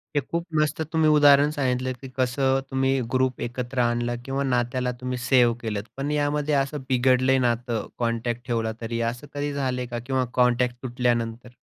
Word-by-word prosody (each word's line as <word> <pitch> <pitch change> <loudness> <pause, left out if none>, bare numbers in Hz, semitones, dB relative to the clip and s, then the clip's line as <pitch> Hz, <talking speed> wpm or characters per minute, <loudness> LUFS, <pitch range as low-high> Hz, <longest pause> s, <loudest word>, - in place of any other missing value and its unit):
हे - - +4
खूप 170 +3 -4 0.2
मस्त 155 +1 -1
तुम्ही 160 -1 +4
उदाहरण 145 -1 +6
सांगितलं 130 -1 0
की 135 - -7
कसं 130 +1 +2
तुम्ही 135 0 +1 0.2
ग्रुप 130 -1 +1
एकत्र 125 +1 -4
आणलं 120 0 0
किंवा 135 +1 -1
नात्याला 125 0 0
तुम्ही 125 0 -3
सेव्ह 125 -2 +3
केलंत. 105 -3 -3
पण 140 +2 -2
यामध्ये 150 0 0
असं 150 +2 -5
बिघडलंय 130 +1 +3
नातं 120 -1 -2
कॉन्टॅक्ट 120 +1 -2
ठेवला 115 -2 0
तरी, 115 +1 -3
असं 135 +4 -12
कधी 145 0 -2
झालंय 130 -3 -1
का? 120 0 -5
किंवा 130 -1 0
कॉन्टॅक्ट 125 0 +3
तुटल्यानंतर? 120 -1 -1
125 Hz, 165 wpm, -25 LUFS, 120-135 Hz, 0.2 s, उदाहरण